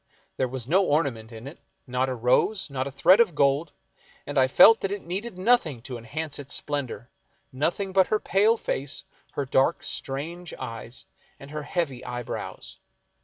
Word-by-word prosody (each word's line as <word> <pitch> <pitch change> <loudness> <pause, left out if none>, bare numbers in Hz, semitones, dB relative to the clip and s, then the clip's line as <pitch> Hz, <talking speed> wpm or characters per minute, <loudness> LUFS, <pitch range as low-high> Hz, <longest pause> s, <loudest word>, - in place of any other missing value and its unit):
There 130 - +1
was 125 -1 -5
no 185 +7 +4
ornament 135 -9 0
in 115 +1 -10
it, 140 +4 -9 0.3
not 130 +1 0
a 130 - -2
rose, 130 - +1
not 130 0 -2
a - - -6
thread 180 - +5
of 205 -9 +4
gold, 140 +3 +2 0.5
and - - -6
I 130 -1 +5
felt 225 +11 +7
that 195 - -2
it 205 -1 -4
needed 190 +4 -5
nothing 185 - +2
to 125 - -6
enhance 145 +6 -5
its 140 0 -5
splendor; 135 -4 -4 0.4
nothing 175 +8 -1
but 190 -1 +5
her 215 - +1
pale 210 +4 +3
face, 140 -9 -4 0.3
her 140 - -2
dark 130 +1 +2
strange 165 +6 -5
eyes, 115 -1 -7 0.3
and 140 +1 -11
her 150 0 -4
heavy 145 -5 -2
eye 120 -1 -5
brows. - - -7
140 Hz, 175 wpm, -26 LUFS, 130-180 Hz, 0.5 s, felt